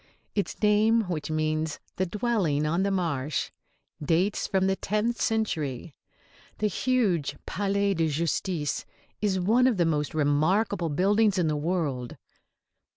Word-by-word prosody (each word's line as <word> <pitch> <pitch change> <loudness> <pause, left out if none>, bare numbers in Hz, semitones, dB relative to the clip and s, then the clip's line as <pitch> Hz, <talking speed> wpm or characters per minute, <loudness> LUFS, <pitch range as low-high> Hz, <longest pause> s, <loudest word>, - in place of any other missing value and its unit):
Its 200 - -2
name, 215 +2 +4
which 175 -8 -4
means 155 0 -1 0.2
"the 185 - 0
dwelling 195 -8 0
on 165 +4 +1
the 200 - +1
marsh," 160 -7 -1 0.5
dates 175 +7 +1
from 190 -1 +1
the 190 0 +2
tenth 215 +4 -1
century. 160 - -1 0.6
The 215 - -1
huge 210 - +1
Palais 200 0 0
de 165 -3 +1
Justice 160 0 -1 0.4
is 195 -3 +1
one 230 +8 +4
of 240 -6 +1
the 175 - +3
most 150 -2 -1
remarkable 160 +6 +1
buildings 200 +6 +2
in 175 -3 +2
the 155 - 0
world. 145 -6 -2
180 Hz, 135 wpm, -27 LUFS, 155-205 Hz, 0.6 s, name